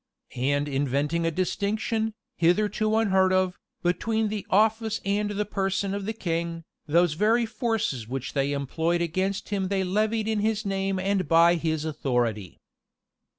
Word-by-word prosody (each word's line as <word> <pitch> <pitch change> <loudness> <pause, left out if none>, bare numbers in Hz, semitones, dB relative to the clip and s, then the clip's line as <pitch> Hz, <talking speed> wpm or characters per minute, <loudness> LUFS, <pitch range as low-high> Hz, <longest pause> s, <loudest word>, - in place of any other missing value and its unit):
And 145 +3 0
inventing 145 +4 0
a - - +3
distinction, 215 +5 -1 0.2
hitherto 210 +5 +2
unheard 190 -4 +3
of, 185 -1 +1 0.2
between 220 +5 0
the 210 -1 -4
office 220 +2 +2
and 205 +1 0
the 205 0 -1
person 195 -1 -1
of 200 -1 -3
the 220 - -2
king, 170 -4 -3 0.2
those 170 +1 +3
very 220 +7 +2
forces 220 - -2
which 130 +1 -4
they 140 0 0
employed 160 +5 0
against 190 +4 -2
him 195 -2 -1
they 195 0 0
levied 215 +3 0
in 220 -1 0
his 215 +1 0
name 195 -1 -1
and 190 0 0
by 170 +1 +6
his 160 -2 -1
authority. 120 - -1
190 Hz, 150 wpm, -26 LUFS, 165-210 Hz, 0.2 s, by